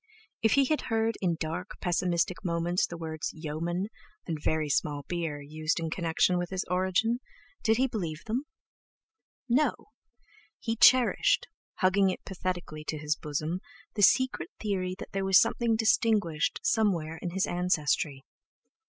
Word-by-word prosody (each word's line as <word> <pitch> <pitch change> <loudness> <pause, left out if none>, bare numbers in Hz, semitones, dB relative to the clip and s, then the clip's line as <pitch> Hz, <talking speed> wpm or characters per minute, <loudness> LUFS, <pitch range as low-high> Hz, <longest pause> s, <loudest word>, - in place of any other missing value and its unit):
If 225 -2 +3
he 280 -1 +5
had 305 +3 +1
heard 225 0 +1
in 175 -3 +1
dark, 165 +4 -4
pessimistic 175 0 0
moments 170 0 0
the 170 - -7
words 160 -1 -4
"yeomen" 170 +5 -3 0.4
and 160 -4 -4
"very 155 0 0
small 145 0 0
beer" 165 -4 -3
used 155 +3 -2
in 165 -1 -3
connection 170 +1 +1
with 175 -1 -3
his 190 -1 -2
origin, 190 +6 +1 0.4
did 220 -1 +3
he 260 - +3
believe 175 -10 -4
them? 245 +6 -2 1.0
No! 260 +5 +3 0.8
he 225 -1 -2
cherished, 255 - +5 0.4
hugging 190 +1 +4
it 185 - -5
pathetically 180 -5 -4
to 155 - -3
his 150 0 0
bosom 155 +4 -3 0.3
the 210 - -2
secret 260 +6 +3
theory 185 -3 -2
that - - -9
there 195 0 -2
was 190 -1 +6
something 235 -2 +2
distinguished 220 -7 +2
somewhere 175 -8 +1
in 175 - -3
his 190 +2 0
ancestry. 155 -5 0
180 Hz, 145 wpm, -29 LUFS, 160-215 Hz, 1.0 s, was